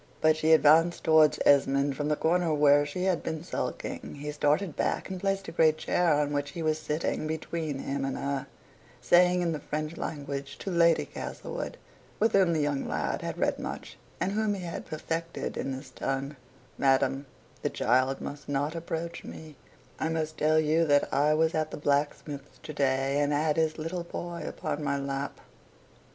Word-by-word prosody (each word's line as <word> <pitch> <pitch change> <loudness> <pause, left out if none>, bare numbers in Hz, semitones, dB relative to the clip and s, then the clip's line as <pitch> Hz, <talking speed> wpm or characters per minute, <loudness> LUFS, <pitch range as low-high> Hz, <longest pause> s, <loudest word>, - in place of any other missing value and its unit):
But 155 - +5
as 155 - 0
she 155 0 +2
advanced 160 +2 +5
towards 155 -1 +5
Esmond 140 0 +4
from 145 +1 -2
the 150 - +2
corner 170 +2 +1
where 145 0 +5
she 180 +5 -4
had 185 -3 +1
been 160 0 -4
sulking, - - -4
he 145 +1 -5
started 150 +4 +1
back - - -1
and 185 - -4
placed 195 0 0
the - - -6
great 155 -2 +4
chair 175 +2 +1
on 145 0 0
which 145 0 -1
he 170 -2 -4
was 155 0 +1
sitting 155 0 -2
between 160 -1 -3
him 135 0 -3
and 135 -1 -2
her 140 -1 -2 0.5
saying 180 0 +4
in 170 - 0
the 155 - -3
French 155 +3 -4
language 140 -2 -5
to 195 - -5
Lady 170 -1 +4
Castlewood, - - -6 0.4
with 220 +2 +3
whom 190 -3 +4
the 155 - +1
young 145 -2 -1
lad - - -2
had - - -4
read - - 0
much, - - -6 0.2
and 190 - 0
whom 210 0 0
he 190 - -6
had 170 -1 -6
perfected 165 +2 -4
in 135 - -3
this 130 0 -7
tongue 135 +3 -3 0.4
"Madam, 135 0 +2 0.3
the - - 0
child 130 +3 +1
must 145 0 -7
not 145 +2 0
approach 170 0 -4
me; 155 -2 -10 0.4
I 160 - 0
must 155 -1 -2
tell 155 +1 +3
you 155 +2 +3
that 145 -1 +3
I 150 +2 +3
was 160 +1 +2
at 155 0 0
the - - -6
blacksmith's 145 -1 -2
to 155 - -7
day, 135 0 +1
and 145 0 +1
had 150 +1 +1
his 160 -1 +1
little 165 +3 -3
boy 170 0 -6
upon 150 - -4
my 140 -1 0
lap." 140 0 -4
155 Hz, 190 wpm, -28 LUFS, 145-165 Hz, 0.5 s, But